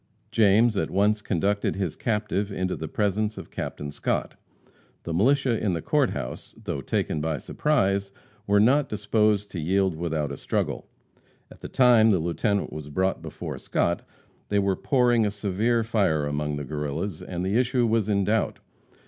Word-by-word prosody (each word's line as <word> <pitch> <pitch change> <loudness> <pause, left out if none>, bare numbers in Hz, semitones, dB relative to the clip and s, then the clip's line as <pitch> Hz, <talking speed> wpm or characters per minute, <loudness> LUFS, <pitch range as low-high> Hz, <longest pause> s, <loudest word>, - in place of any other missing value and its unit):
James 110 +1 +4
at - - 0
once 105 +2 +2
conducted 100 +2 0
his 95 -5 -2
captive 105 -2 -1
into 95 -1 -2
the - - -5
presence 105 +1 -1
of - - -9
Captain 75 0 -5
Scott. 75 - -2 0.7
The 85 - -4
militia 125 +5 +2
in 100 -4 +1
the 85 - -2
Court - - +2
house, - - -6
though - - -4
taken 75 - -1
by 80 -1 -1
surprise, 100 - 0 0.4
were 100 0 +4
not 135 +7 +4
disposed 105 -1 +1
to 90 - -4
yield 95 +3 +1
without 80 -3 -2
a 70 - -5
struggle. - - -2 0.6
At - - -14
the - - -7
time 120 -4 +5
the 100 - +4
Lieutenant 95 +5 -1
was 75 -1 -7
brought 95 +5 0
before - - -6
Scott, 85 0 0 0.5
they 105 - +1
were 100 -1 +2
pouring 120 -2 +2
a 105 - +2
severe 105 +3 0
fire 95 -10 +1
among 75 0 -2
the 75 0 -4
Guerrillas, 75 +5 -4
and 90 0 -4
the 95 +3 0
issue 125 0 +2
was 110 -2 +1
in 100 -1 +2
doubt. 110 +2 0
100 Hz, 170 wpm, -25 LUFS, 85-110 Hz, 0.7 s, time